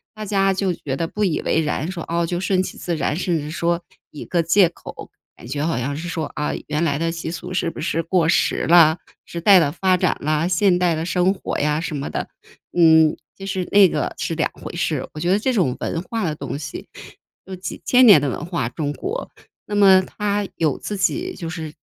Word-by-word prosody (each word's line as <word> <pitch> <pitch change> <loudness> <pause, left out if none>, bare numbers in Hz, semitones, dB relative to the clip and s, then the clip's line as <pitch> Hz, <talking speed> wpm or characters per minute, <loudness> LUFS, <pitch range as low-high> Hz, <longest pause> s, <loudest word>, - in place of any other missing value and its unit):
大 215 0 -6
家 195 -1 +2
就 190 -1 0
觉 135 -5 -5
得 165 +4 -2
不 210 +5 -3
以 175 -6 +1
为 160 - +1
然， 150 +2 -2
说： 170 -3 -6
“哦， 170 0 0
就 175 +1 -2
顺 185 0 +1
其 - - -7
自 175 - -3
然。” 150 -1 -1
甚 175 -1 0
至 150 0 -5
说 170 +1 -1 0.3
一 150 - -8
个 175 - +1
借 175 +3 +5
口， 175 - -11 0.3
感 115 - -12
觉 145 +3 -2
好 165 - -1
像 135 +3 -2
是 170 +3 -5
说： 160 -3 -3
“啊， 150 - -1 0.2
原 150 +2 -1
来 145 -4 +1
的 165 +1 -1
习 165 -1 -5
俗 180 +2 -7
是 175 -2 0
不 - - -10
是 165 0 -1
过 170 0 +1
时 165 - +1
啦？ 165 -1 +6 0.3
时 170 - -6
代 190 +2 +7
的 145 -4 +1
发 185 +3 +2
展 - - +1
啦， 155 +3 0
现 185 0 +3
代 175 -2 +2
的 160 +1 -3
生 180 +1 +2
活 200 - -5
呀。” 150 +1 +1
什 165 -2 -4
么 140 0 -4
的。 - - -4 0.5
嗯， 160 -2 +5 0.2
其 195 - -8
实 190 -2 -2
那 200 -2 +7
个 - - -2
是 - - -3
2 155 - 0
回 - - -9
事。 155 -5 -2
我 155 - -7
觉 170 +3 0
得 195 - +3
这 260 +4 0
种 165 - +1
文 165 - -3
化 225 +2 -3
的 155 -2 -2
东 140 - -5
西 145 -1 -7 0.6
有 190 - -7
几 185 - -7
千 255 0 +5
年 205 -9 +9
的 140 - 0
文 - - -5
化， 170 -9 -2
中 145 +3 -3
国。 440 - -5 0.4
那 210 - -4
么 195 -2 +6
它 205 +1 -2
有 155 -4 0
自 205 - -5
己 360 - -1
就 170 - -6
是 160 -3 -6
170 Hz, 250 characters per minute, -21 LUFS, 155-190 Hz, 0.6 s, 年